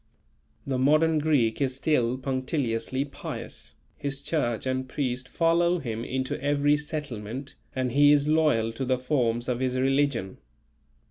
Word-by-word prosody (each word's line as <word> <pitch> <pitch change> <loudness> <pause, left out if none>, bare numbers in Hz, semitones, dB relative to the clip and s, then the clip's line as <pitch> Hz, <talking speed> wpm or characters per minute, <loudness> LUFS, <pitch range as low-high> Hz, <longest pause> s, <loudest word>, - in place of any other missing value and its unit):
The 130 -2 -1
modern 155 +4 +4
Greek 145 -6 +1
is 130 -2 +1
still 130 -4 +1
punctiliously 130 -1 -1
pious, 140 - -7 0.2
his 140 -1 -3
church 120 -9 -1
and 130 0 -2
priest 130 -2 -3
follow 170 +1 +2
him 115 -7 -4
into 130 +1 -3
every 145 +1 +3
settlement, 140 -4 -5 0.2
and 130 -1 -1
he 145 +3 +6
is 145 0 +4
loyal 150 -8 +3
to 130 - -4
the 130 0 +1
forms 125 -3 0
of 125 -1 -1
his 130 0 0
religion. 135 -6 0
130 Hz, 140 wpm, -27 LUFS, 125-145 Hz, 0.2 s, he